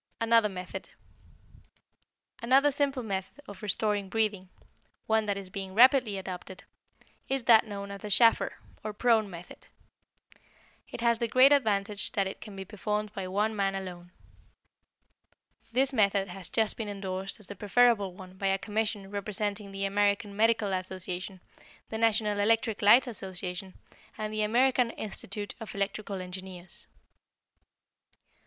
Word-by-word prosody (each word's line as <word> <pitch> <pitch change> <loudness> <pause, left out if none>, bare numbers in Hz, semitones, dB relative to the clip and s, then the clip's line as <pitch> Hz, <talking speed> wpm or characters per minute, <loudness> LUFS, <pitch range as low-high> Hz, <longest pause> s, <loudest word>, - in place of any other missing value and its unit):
Another 230 -1 +4
Method 180 -1 -7 1.5
Another 270 +5 +4
simple 275 -2 0
method 195 +3 -4
of 200 -2 -10
restoring 205 -1 -1
breathing, 205 -3 -1 0.6
one 220 -1 +1
that 200 -1 0
is 190 -2 -8
being 195 -1 -6
rapidly 245 -3 +5
adopted, 185 0 -7 0.7
is 270 -1 0
that 230 -1 +6
known 200 -1 -6
as 200 - -8
the 210 - -6
Schafer, 230 +3 +4 0.3
or 215 0 -4
prone, 220 -2 +2
method. 175 -1 -11 1.2
It - - -7
has 235 -1 +3
the 235 - 0
great 255 +4 +6
advantage 210 -7 +2
that 195 - +1
it 190 - -6
can 210 -3 -9
be 195 0 -6
performed 210 +1 -3
by 195 -3 -4
one 210 +4 0
man 195 -1 0
alone. 180 -2 -7 1.6
This 265 +3 +4
method 200 -4 +2
has 180 0 -6
just 220 -2 +1
been 220 -2 -4
endorsed 195 -1 -4
as 210 - -6
the 205 - -7
preferable 210 -3 +3
one 185 0 -12
by 195 - -1
a 195 0 +2
commission 210 0 -2
representing 205 0 -3
the 195 0 -2
American 200 +1 +1
Medical 220 -2 +2
Association, 185 0 -4 0.5
the 220 - -4
National 215 -2 +2
Electric 225 +1 +2
Light 220 +6 +7
Association, 190 -4 -6 0.4
and 215 0 -4
the 215 - -1
American 245 +3 +3
Institute 205 -2 -5
of 220 -4 -8
Electrical 200 -1 -3
Engineers. 185 -1 -8
205 Hz, 140 wpm, -29 LUFS, 195-225 Hz, 1.6 s, Light